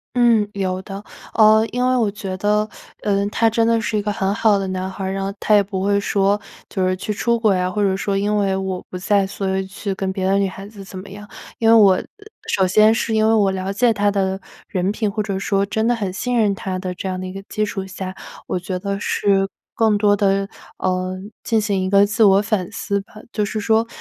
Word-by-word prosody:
嗯， 235 -4 +4
有 185 -2 -2
的， 195 0 -8 0.3
呃， 220 0 +6
因 250 0 -1
为 255 - +2
我 225 -4 +2
觉 195 -2 -5
得， 210 +2 +1 0.3
呃， 200 -1 +1
他 225 -1 +3
真 230 0 +1
的 230 0 +2
是 215 - -1
一 - - +1
个 210 0 -2
很 195 -1 0
好 215 -3 +3
的 195 - -3
男 185 0 -3
孩 190 +1 -7
儿， 190 - -2
然 195 0 -2
后 195 0 -3
他 215 - +3
也 205 - +5
不 195 -1 -4
会 200 0 +2
说 200 0 +1 0.3
就 190 -2 -1
是 185 - +1
去 190 - -4
出 235 +3 0
轨 215 -4 +3
啊， 180 0 0
或 210 +2 -1
者 190 -1 +2
说 200 0 -1
因 205 +1 +1
为 195 -2 +1
我 190 -1 -2
不 - - -7
在， 200 +1 +2
所 190 0 -2
以 190 - -2
去 200 +1 -5
跟 190 0 -2
别 190 - -3
的 195 +1 +3
女 200 - +2
孩 195 +1 -8
子 205 -2 -11
怎 190 0 -10
么 195 - -10
样。 205 +2 -10 0.3
因 225 - +1
为 225 - +7
我， 205 -4 +7
呃， - - -2 0.4
首 190 -2 +2
先 215 +4 +5
是 225 -1 -1
因 220 0 +3
为 225 - +4
我 205 -3 +3
了 190 +1 -3
解 240 +3 +3
他 205 -1 +1
的 190 -1 -1 0.3
人 190 -2 -1
品， 215 0 -1
或 210 +1 -2
者 195 -2 -3
说 195 0 +1
真 220 +3 -1
的 245 - +3
很 200 -5 -3
信 245 +4 -1
任 210 -3 +3
他 190 -1 -4
的 185 -1 -4
这 190 +1 -5
样 185 0 -3
的 185 - -5
一 185 - -6
个 195 - -7
基 215 - 0
础 195 -2 -4
下， 190 0 -6 0.3
我 180 - -2
觉 185 +1 -4
得 200 +2 -3
是 195 -2 +1 0.2
更 220 -2 +2
多 205 0 +3
的， 195 -1 +1 0.3
呃， 185 0 -1 0.3
进 225 - +1
行 205 -3 0
一 185 - -1
个 200 +1 +5
自 210 +2 +1
我 195 -1 +6
反 205 -3 -1
思 200 -2 -2
吧， 195 - -21 0.2
就 210 - -1
是 215 +1 -2
说。 225 +2 +2
200 Hz, 270 characters per minute, -20 LUFS, 190-215 Hz, 0.4 s, 为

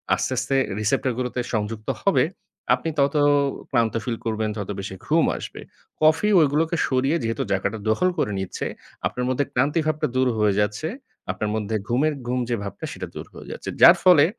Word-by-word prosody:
আস্তে, - - -2
আস্তে 135 - 0 0.2
রিসেপ্টর 110 +4 +1
গুলোতে 125 0 -2
সংযুক্ত 110 0 -3 0.2
হবে, 195 - +4 0.5
আপনি 165 - -4
তত 140 +2 +2 0.5
ক্লান্ত 115 -4 +1
ফিল 120 -2 -2
করবেন, 110 -1 -1
তত 100 -2 -5
বেশি 95 0 -5
ঘুম - - +3
আসবে। - - -8 0.4
কফি 155 +6 +4 0.3
গুলোকে 160 +2 +1
সরিয়ে 135 +5 +1
যেহেতু 115 -1 -1
জায়গাটা 100 +3 0
দখল 180 +12 +3
করে 105 - 0
নিচ্ছে, 95 -1 -4 0.4
আপনার 125 - -3
মধ্যে 130 +2 +1
ক্লান্তি 140 +6 +1
ভাবটা 155 -1 0
দূর 130 0 +3
হয়ে 105 -2 +3
যাচ্ছে। 105 +10 -1 0.4
আপনার 105 - -3
মধ্যে 110 0 -2
ঘুমের 145 +6 +2
ঘুম 125 +1 0
যে, 120 - +1
ভাবটা, 100 - -6
সেটা - - -6
দূর - - -6
হয়ে - - -11
যাচ্ছে। - - -6
যার - - +10
ফলে 175 -6 +7
125 Hz, 175 wpm, -23 LUFS, 110-145 Hz, 0.5 s, যার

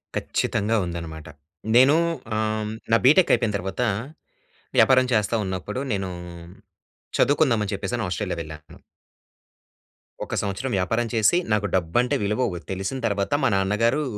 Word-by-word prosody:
ఖచ్చితంగా 105 +3 -1
ఉందన్నమాట. 85 -2 -7 0.5
నేను 130 +4 +7 0.4
ఆహ్, 110 - +1 0.2
హ్మ్, 105 - -4 0.2
నా - - +7
బిటెక్ 155 +7 +6
అయిపోయిన 115 -3 -1
తర్వాత, 95 +4 -4 1.0
వ్యాపారం 130 -1 +5
చేస్తా 110 +1 +1
ఉన్నప్పుడు 95 +5 -4
నేను 95 -2 -2 1.1
చదువుకుందాం 140 -5 +3
అని 100 - -4
చెప్పేసని 105 +4 -3
ఆస్ట్రేలియా 90 -1 -3
వెళ్ళాను. 75 -1 -12 1.5
ఒక - - -4
సంవత్సరం 105 +6 -3
వ్యాపారం 115 +6 0
చేసి 110 +8 +3 0.2
నాకు 105 -1 +1
డబ్బంటే 95 +8 +1
విలువ 105 +5 0
వో 85 - -5
తెలిసిన 95 +7 -3
తర్వాత, 100 -1 -1
మా 130 - +4
నాన్నగారు 115 +9 +1
105 Hz, 125 wpm, -24 LUFS, 95-120 Hz, 1.5 s, నేను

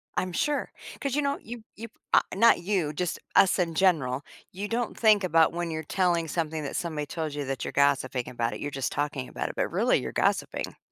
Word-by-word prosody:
I'm 185 0 -1
sure, 290 - -1 0.3
'cause, 275 -2 -1
you 295 - +2
know, 280 0 0
you 235 0 -8
you 230 +2 -7 0.3
I - - +7
not 230 -1 +6
you, 175 -5 -1
just 175 +2 -2 0.2
us 195 -1 +5
in 165 -2 0
general. 145 -8 +2 0.3
You 200 +3 -5
don't 235 +1 -2
think 215 -3 +5
about 165 -3 +4
when 175 0 -2
you're 160 0 -3
telling 175 0 +1
something 160 -1 -2
that 140 - -5
somebody 155 -4 -2
told 155 0 -4
you 145 -1 -3
that 135 0 -3
you're - - -4
gossiping 140 -3 +2
about 120 -2 -2
it, - - -6
you're 145 - -3
just 135 -3 -2
talking 145 -3 -2
about - - -3
it, - - -8
but - - 0
really, - - +3
you're 65 -1 -5
gossiping. - - -1
165 Hz, 220 wpm, -27 LUFS, 145-195 Hz, 0.3 s, I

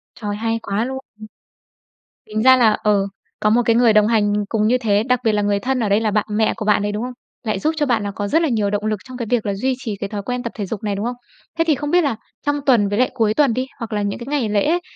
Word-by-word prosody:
Trời, 205 -2 -4
hay 225 +1 -1
quá 200 +3 -1
luôn! 265 +1 -4 1.3
Tính 215 0 -2
ra 260 +1 +7
là, 230 -4 +4
ờ, 205 -2 +2 0.3
có 210 - +2
một 240 +3 +4
cái 230 0 +3
người 235 -2 +5
đồng 210 -1 +5
hành 215 -2 +2 0.2
cùng 215 -1 +1
như 250 +3 +3
thế, 210 -4 +2
đặc 250 +1 +1
biệt 220 - +3
là 210 0 +1
người 205 0 +1
thân, 260 +2 -1
ở 220 - 0
đây 200 +2 +3
là 220 -1 0
bạn 210 0 +1
mẹ 215 +1 +2
của - - -4
bạn 210 -1 +3
đấy, 205 0 -1
đúng 210 +2 -3
không? 250 +1 -4 0.3
Lại 215 -3 -1
giúp 310 +10 0
cho 295 -2 +1
bạn 235 -4 +1
là 205 - -3
có 205 +1 -4
rất 320 +9 +2
là 325 - +2
nhiều 215 -5 0
động 205 +1 -2
lực 215 -1 0
trong 255 -1 -9
cái 240 -2 -4
việc 240 -4 +1
là 200 - 0
duy 260 +6 0
trì 225 -6 -5
cái 200 - -3
thói 205 0 -5
quen 250 +3 -3
tập 235 - -5
thể 205 - -3
dục 205 +1 -5
này, 205 -2 -1
đúng 200 +2 -3
không? 245 +1 -2 0.4
Thế 330 - +3
thì 310 - +4
không 290 +1 -4
biết 355 0 +4
là 275 -6 0 0.3
trong 290 0 +1
tuần 230 -7 +4
với 205 +1 -1
lại 255 - +3
cuối 220 -3 +1
tuần 280 -4 +3
đi, 255 +2 -1
hoặc 230 -1 -6
là 210 -1 0
những 200 -1 -2
cái 235 - -8
ngày 280 -7 0
lễ 210 +2 +1
ấy, 340 +3 +2
220 Hz, 310 wpm, -20 LUFS, 205-250 Hz, 1.3 s, ra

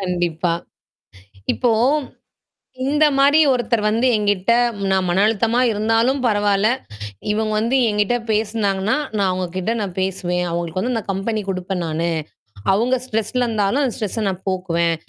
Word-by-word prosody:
கண்டிப்பா. 175 -2 -1 1.0
இப்போ 245 -2 +1 1.1
இந்த 295 +3 +3
மாரி 285 +3 +5
ஒருத்தர் 240 -3 0
வந்து 225 +4 +2
என்கிட்ட 205 0 +1 0.4
நான் 190 -1 +2
மனஅழுத்தமா 220 +5 +2
இருந்தாலும் 225 +5 +1
பரவால. 205 -3 +2 0.7
இவங்க 215 +1 -1
வந்து 230 +5 +1
என்கிட்ட 210 +2 +1 0.2
பேசினாங்கன்னா, 210 -2 0 0.2
நான் 200 -2 +2
அவங்ககிட்ட 185 +2 -2
நான் 195 -4 -4
பேசுவேன். 180 -2 -1
அவங்களுக்கு 175 +8 -2
நான் 220 - -6
கம்பெனி 210 +3 -2
குடுப்பேன் 185 0 -3
நானு. 165 +1 -1 0.6
அவங்க 240 +6 +2
ஸ்ட்ரெஸ்ல 225 +1 -1
இருந்தாலும் 220 +3 0
அந்த 255 -4 0
ஸ்ட்ரெஸ்ஸ 220 -1 -3
நான் 190 -1 -5
போக்குவேன். 170 -3 0
205 Hz, 125 wpm, -20 LUFS, 185-225 Hz, 1.1 s, மாரி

